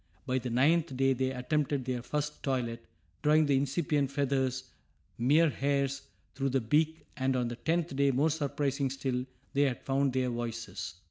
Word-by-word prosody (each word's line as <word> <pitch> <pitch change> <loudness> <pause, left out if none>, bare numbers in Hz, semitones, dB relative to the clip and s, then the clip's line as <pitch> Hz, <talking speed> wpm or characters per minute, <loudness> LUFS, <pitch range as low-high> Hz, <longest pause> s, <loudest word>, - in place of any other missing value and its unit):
By 130 -1 0
the 125 0 -4
ninth 140 +3 +2
day 135 0 +3
they 130 +1 0
attempted 135 +1 -1
their 125 -1 -2
first 150 +4 -3
toilet, 120 -4 -2 0.4
drawing 155 +1 +4
the 140 -1 +3
incipient 140 +1 +1
feathers, 135 -2 0 0.6
mere 150 +6 +4
hairs, 140 -1 0 0.3
through 135 0 -1
the 135 +1 +2
beak, 155 +7 +1
and 130 -1 0
on 125 -2 0
the 120 - -4
tenth 160 +5 -1
day, 140 0 +3
more 140 +5 +2
surprising 140 -2 -1
still, 130 -1 -2 0.3
they 140 - +2
had 135 -4 +1
found 135 0 +1
their 130 -1 +1
voices. 115 -6 -5
135 Hz, 170 wpm, -30 LUFS, 130-145 Hz, 0.6 s, drawing